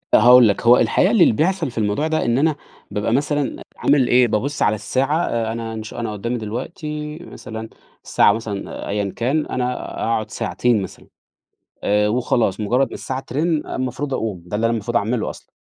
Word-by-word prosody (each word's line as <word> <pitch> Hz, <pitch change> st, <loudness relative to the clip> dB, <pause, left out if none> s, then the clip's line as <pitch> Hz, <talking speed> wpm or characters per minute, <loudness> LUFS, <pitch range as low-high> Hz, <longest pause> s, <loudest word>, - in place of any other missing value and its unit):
هاقول 125 Hz, +1 st, +8 dB
لك، 100 Hz, -, 0 dB
هو 120 Hz, +1 st, +8 dB
الحقيقة 185 Hz, -, +3 dB
اللي 210 Hz, -, +5 dB
بيحصَل 165 Hz, -, 0 dB
في -, -, -17 dB
الموضوع 105 Hz, +8 st, 0 dB
ده 160 Hz, 0 st, 0 dB
إن 120 Hz, +1 st, +2 dB
أنا 155 Hz, +1 st, +2 dB, 0.4 s
بابقى 105 Hz, +2 st, -1 dB
مثلًا 145 Hz, +1 st, -1 dB, 0.2 s
عامل 140 Hz, -3 st, +3 dB
إيه، 125 Hz, 0 st, +5 dB
بابُص 130 Hz, +7 st, -2 dB
على 105 Hz, -, +3 dB
الساعة 135 Hz, +7 st, 0 dB
آآ، 115 Hz, -1 st, -1 dB
أنا 115 Hz, 0 st, -5 dB
إنش 110 Hz, -1 st, -7 dB
أنا 115 Hz, -2 st, -4 dB
قُدّامي 115 Hz, +4 st, -3 dB
دلوقتي 150 Hz, +7 st, -5 dB
مثلًا 110 Hz, -9 st, -8 dB, 0.3 s
الساعة -, -, +4 dB
مثلًا 110 Hz, -3 st, -5 dB
أيًا 100 Hz, -1 st, -2 dB
كان، 135 Hz, +6 st, 0 dB
أنا 125 Hz, 0 st, -1 dB, 0.3 s
أقعُد 110 Hz, -1 st, -1 dB
ساعتين 120 Hz, -4 st, 0 dB
مثلًا، -, -, -9 dB, 0.8 s
آآ 105 Hz, +1 st, +2 dB
وخلاص، 120 Hz, -3 st, 0 dB
مُجرّد 125 Hz, +6 st, +1 dB
ما -, -, -9 dB
الساعة 130 Hz, 0 st, -4 dB
ترِن 150 Hz, +4 st, -1 dB
المفروض 130 Hz, +2 st, -3 dB
أقُوم، 105 Hz, -8 st, -3 dB
ده 105 Hz, -, -3 dB
اللي 110 Hz, -, -1 dB
أنا 115 Hz, -, +1 dB
المفروض 120 Hz, +2 st, -2 dB
أعمله 110 Hz, +1 st, 0 dB
أصلًا، -, -, -12 dB
120 Hz, 180 wpm, -20 LUFS, 110-140 Hz, 0.8 s, هاقول